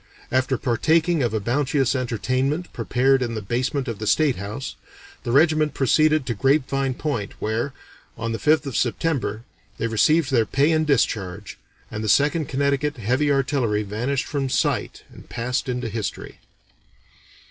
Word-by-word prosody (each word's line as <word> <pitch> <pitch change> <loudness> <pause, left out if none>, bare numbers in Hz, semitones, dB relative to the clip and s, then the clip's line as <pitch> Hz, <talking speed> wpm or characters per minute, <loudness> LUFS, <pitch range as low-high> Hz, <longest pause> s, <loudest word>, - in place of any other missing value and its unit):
After 130 0 +1
partaking 160 +7 +2
of 120 -3 +1
a 110 - -1
bounteous 135 +4 +1
entertainment 130 +6 -1
prepared 135 +1 +2
in 120 -2 -2
the - - -2
basement 130 +6 -1
of 115 -4 -4
the 110 - -4
State 150 -1 +3
House, 105 +8 -6 0.5
the 120 - -2
regiment 155 +2 +3
proceeded 155 +2 +3
to 120 - -1
Grapevine 135 +2 +1
Point, 125 -10 -3
where, 115 +5 -1 0.5
on 115 0 -3
the 115 - -3
5th 155 0 +3
of 135 - -5
September, 120 -4 -1 0.3
they - - -2
received 140 +7 +2
their 115 -4 +3
pay 145 +4 +2
and 155 -1 +1
discharge, 105 -7 -1 0.3
and 105 - -4
the 110 - -1
Second 150 +5 +2
Connecticut 140 +1 0
Heavy 130 +6 +1
Artillery 135 -6 +1
vanished 120 +7 -2
from 140 -2 -2
sight - - -1
and - - -15
passed 125 +3 -2
into 125 -1 -2
History." 110 -1 -5
130 Hz, 155 wpm, -23 LUFS, 115-145 Hz, 0.5 s, State